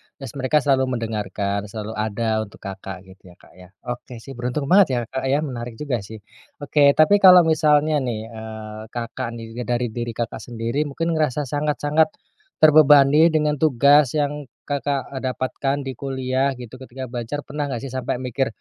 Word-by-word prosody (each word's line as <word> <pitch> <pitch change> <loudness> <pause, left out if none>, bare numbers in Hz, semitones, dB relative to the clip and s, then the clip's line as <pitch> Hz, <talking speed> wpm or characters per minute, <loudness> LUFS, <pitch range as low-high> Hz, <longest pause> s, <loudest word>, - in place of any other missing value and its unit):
terus 135 -5 -9
mereka 140 +3 +2
selalu 130 -2 +1
mendengarkan, 105 -3 -3
selalu 105 +1 -6
ada 110 0 -1
untuk, 100 - -18
Kakak, 95 -1 -7
gitu 95 0 -18
ya, 90 - -15
Kak, - - -21
ya. 90 - -13 0.2
Oke 120 -1 -9
sih 135 - -10
beruntung 125 +4 -3
banget 195 -1 +7
ya, - - +1
Kak, 130 - -3
ya, 140 +3 +1
menarik 120 -5 -6
juga 130 -1 -2
sih. 110 +1 -11 0.4
Oke 145 -1 +4
tapi 155 +7 +5
kalau 185 -2 +8
misalnya 155 -1 +3
nih, 115 -4 -4
eee, 110 -1 -8
Kakak, 120 +2 -5
nih 115 +1 -7
dari 120 -1 -1
diri, 120 0 -5
Kakak, 115 -1 -4
sendiri 115 +2 -3
mungkin 165 +4 -2
ngerasa 150 -3 0
sangat-sangat 150 +2 +1 0.6
terbebani 150 0 +7
dengan 150 -3 0
tugas 145 -1 +4
yang 145 -1 -2 0.2
Kakak 140 -1 -2
dapatkan 130 +2 -2
di 135 - -4
kuliah 135 0 -1
gitu 125 0 -10
ketika 130 0 -9
belajar 125 +4 -4
pernah 145 0 -4
gak 125 -3 -5
sih 135 - -6
sampai 130 -1 -2
mikir, 130 +1 -2
130 Hz, 170 wpm, -22 LUFS, 115-145 Hz, 0.6 s, kalau